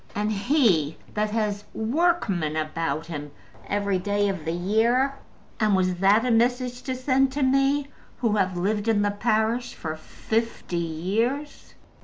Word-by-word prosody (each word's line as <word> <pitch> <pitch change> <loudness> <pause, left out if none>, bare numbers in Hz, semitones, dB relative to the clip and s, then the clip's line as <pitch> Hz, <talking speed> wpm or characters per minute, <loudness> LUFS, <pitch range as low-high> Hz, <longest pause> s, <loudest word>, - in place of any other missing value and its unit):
And 210 +1 0
he 200 - +2 0.2
that 210 0 0
has 210 -2 -1
workmen 220 - +1
about 155 +1 -2
him 150 -3 -6 0.4
every 200 -2 0
day 205 +2 0
of 190 -6 -4
the 165 - -1
year! 225 +10 +2 0.5
And 215 -2 +3
was 185 -1 +2
that 205 +5 +4
a 250 - +1
message 245 +2 +1
to 260 - -3
send 260 +1 +2
to 285 0 0
me, 275 +2 +2 0.3
who 225 -3 +1
have 185 -2 0
lived 205 +4 -1
in 210 -2 +3
the 205 - +1
parish 220 +3 0
for 155 -1 -5
fifty 220 +3 -3
years? 205 - -2
210 Hz, 150 wpm, -25 LUFS, 185-245 Hz, 0.5 s, that